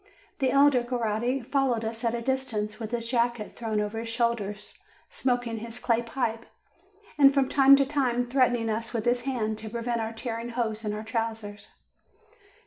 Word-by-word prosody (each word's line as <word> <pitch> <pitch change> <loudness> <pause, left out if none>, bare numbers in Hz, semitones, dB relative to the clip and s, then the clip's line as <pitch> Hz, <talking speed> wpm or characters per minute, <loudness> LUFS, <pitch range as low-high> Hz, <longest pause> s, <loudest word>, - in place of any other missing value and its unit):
The 265 -2 +2
elder 275 -2 +5
Coretti 240 +1 -1
followed 250 -3 0
us 225 +1 -4
at 230 0 +1
a 235 - -4
distance, 230 -5 -2
with 220 -2 -4
his 235 -1 -3
jacket 235 -2 0
thrown 220 -2 -2
over 210 +2 -2
his 230 0 -5
shoulders, 220 -3 -2 0.3
smoking 245 -3 -1
his 230 +1 -7
clay 235 -1 +1
pipe, 230 -1 -3 0.7
and 275 -1 +8
from 275 -1 +2
time 275 0 +7
to 275 0 +3
time 255 -4 0
threatening 245 -2 +2
us 225 +2 -3
with 225 -2 -2
his 240 0 +1
hand, 220 -5 -1
to 220 0 -6
prevent 235 +1 -2
our 220 0 -3
tearing 230 +1 -5
holes 230 -2 -2
in 210 -1 -2
our 215 - -5
trousers. 225 -2 -4
235 Hz, 175 wpm, -27 LUFS, 225-250 Hz, 0.7 s, and